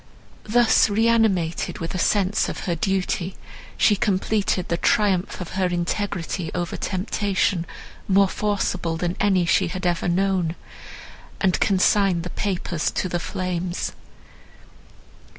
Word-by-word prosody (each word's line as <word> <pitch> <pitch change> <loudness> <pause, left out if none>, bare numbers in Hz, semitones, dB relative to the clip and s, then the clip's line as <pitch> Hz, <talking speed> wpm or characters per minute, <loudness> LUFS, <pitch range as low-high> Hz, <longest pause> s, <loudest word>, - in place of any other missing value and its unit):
Thus 235 -1 +4
reanimated 210 -6 +1
with 165 - -5
a 185 - -2
sense 200 +2 +1
of - - -5
her 175 - -1
duty, 185 +1 -1 0.4
she 210 - +4
completed 200 -2 0
the 170 - 0
triumph 195 0 +1
of 180 - -6
her 190 -1 0
integrity 175 -1 -2
over 175 -1 -2
temptation, 190 -2 -1 0.4
more 195 0 +4
forcible 185 -5 -1
than 175 +1 -2
any 190 -3 +3
she 185 +2 +2
had 185 +2 -5
ever 175 0 0
known, 180 -2 +1 0.8
and 185 -3 +2
consigned 195 -2 +3
the 180 - -6
papers 180 -5 -2
to - - -2
the 175 - -1
flames. 180 0 -3
185 Hz, 125 wpm, -23 LUFS, 175-200 Hz, 0.8 s, Thus